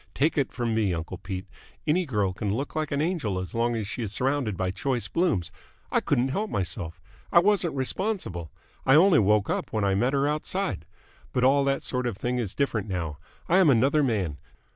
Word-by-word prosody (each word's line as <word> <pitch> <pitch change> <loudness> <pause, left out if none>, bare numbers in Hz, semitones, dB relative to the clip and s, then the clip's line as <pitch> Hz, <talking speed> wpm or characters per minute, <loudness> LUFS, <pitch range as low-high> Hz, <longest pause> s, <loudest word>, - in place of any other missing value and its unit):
Take 150 +4 +2
it 140 -3 0
from 120 -2 -2
me, 105 -5 +1
uncle 80 +3 -5
Pete, 95 0 -5 0.4
any 165 +3 +2
girl 105 -7 0
can 100 +1 -2
look 135 +9 -3
an 150 -2 -1
angel 155 - -1
as 95 -1 -5
long 120 +1 +1
as 110 -3 -3
she 120 - -4
is 110 -4 -3
surrounded 130 -3 0
by 95 0 0
choice 125 +4 -1
blooms. 160 - 0 0.4
I - - +3
couldn't 125 +2 +1
help 210 +10 -1
myself. 85 -2 -4 0.3
I 170 - +7
wasn't 185 -4 +2
responsible. 130 - -2 0.3
I 135 - +5
only 180 +3 +6
woke 105 0 +3
up - - -2
when 110 -2 0
I 100 -1 +2
met 120 +7 +1
her 140 0 +2
outside. 155 - -2 0.5
But 125 - +1
all 140 +2 +5
that 135 0 0
sort 125 -1 -1
of 110 -5 -3
thing 125 +3 -1
is 105 -6 -3
different 115 -7 0
now. 85 -6 -3 0.3
I 180 +3 +4
am 180 -5 +6
another 135 +4 +4
man. 100 - 0
120 Hz, 205 wpm, -26 LUFS, 100-145 Hz, 0.5 s, I